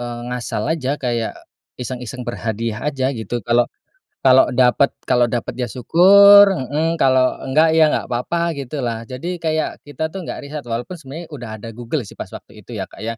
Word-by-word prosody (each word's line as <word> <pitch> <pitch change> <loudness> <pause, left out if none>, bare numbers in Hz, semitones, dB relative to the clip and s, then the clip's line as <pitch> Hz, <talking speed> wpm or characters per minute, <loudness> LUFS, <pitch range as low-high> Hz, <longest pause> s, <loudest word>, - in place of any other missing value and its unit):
eee, 120 0 -5
ngasal 120 -3 -3
aja, 145 -3 -2
kayak 120 -4 -2 0.4
iseng-iseng 125 0 -6
berhadiah 115 -2 -3
aja, 135 -2 -1
gitu. 115 -2 -5
Kalau 120 +2 +2 0.5
kalau 130 -1 +5
dapet 125 +2 +3 0.2
kalau 125 -1 +4
dapet 120 0 -4
ya 125 - -1
syukur 200 - +7
heeh, 155 +2 -1
kalau 130 -1 +3
enggak, 155 +4 +3
ya 160 -1 +5
enggak - - -1
apa-apa, 170 +8 -1
gitu 140 0 -6
lah. 115 -1 -3
Jadi 165 +9 -6
kayak, 160 -1 -2
kita 160 +2 -5
tuh 195 - -5
nggak 160 - -7
riset, 150 +1 -6
walaupun 120 +7 -5
sebenarnya 160 0 -9
udah 125 -5 -7
ada 115 +2 -9
Google 120 +3 -4
sih, - - -12
pas - - -8
waktu - - -12
itu - - -27
ya, - - -3
Kak, - - -15
ya. 115 +1 -4
130 Hz, 185 wpm, -19 LUFS, 120-155 Hz, 0.5 s, syukur